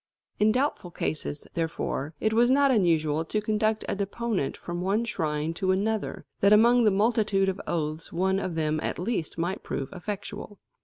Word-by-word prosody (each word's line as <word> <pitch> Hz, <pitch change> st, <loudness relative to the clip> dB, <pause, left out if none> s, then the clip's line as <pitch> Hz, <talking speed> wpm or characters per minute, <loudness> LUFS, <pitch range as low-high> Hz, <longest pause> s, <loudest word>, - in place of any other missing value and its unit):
In 210 Hz, +1 st, +5 dB
doubtful 255 Hz, -6 st, 0 dB
cases, 155 Hz, -3 st, -3 dB
therefore, 160 Hz, -2 st, -3 dB
it 220 Hz, 0 st, +1 dB
was 240 Hz, +2 st, +4 dB
not 275 Hz, +1 st, +4 dB
unusual 160 Hz, -, +2 dB
to 215 Hz, -, -1 dB
conduct 215 Hz, 0 st, 0 dB
a -, -, -1 dB
deponent 200 Hz, -4 st, -2 dB
from 175 Hz, 0 st, -5 dB
one 200 Hz, +5 st, +1 dB
shrine 155 Hz, -6 st, -1 dB
to 185 Hz, +2 st, -2 dB
another, 205 Hz, +3 st, -1 dB
that 200 Hz, -, +4 dB
among 235 Hz, +3 st, +6 dB
the -, -, +6 dB
multitude 205 Hz, -1 st, +2 dB
of 190 Hz, +1 st, -3 dB
oaths 155 Hz, -1 st, -2 dB
one 190 Hz, +3 st, +1 dB
of 185 Hz, -4 st, -3 dB
them 155 Hz, -1 st, 0 dB
at -, -, -2 dB
least 180 Hz, -4 st, -2 dB
might 175 Hz, +4 st, -2 dB
prove 135 Hz, -1 st, -4 dB
effectual. 205 Hz, +2 st, -6 dB
195 Hz, 170 wpm, -27 LUFS, 165-215 Hz, -, among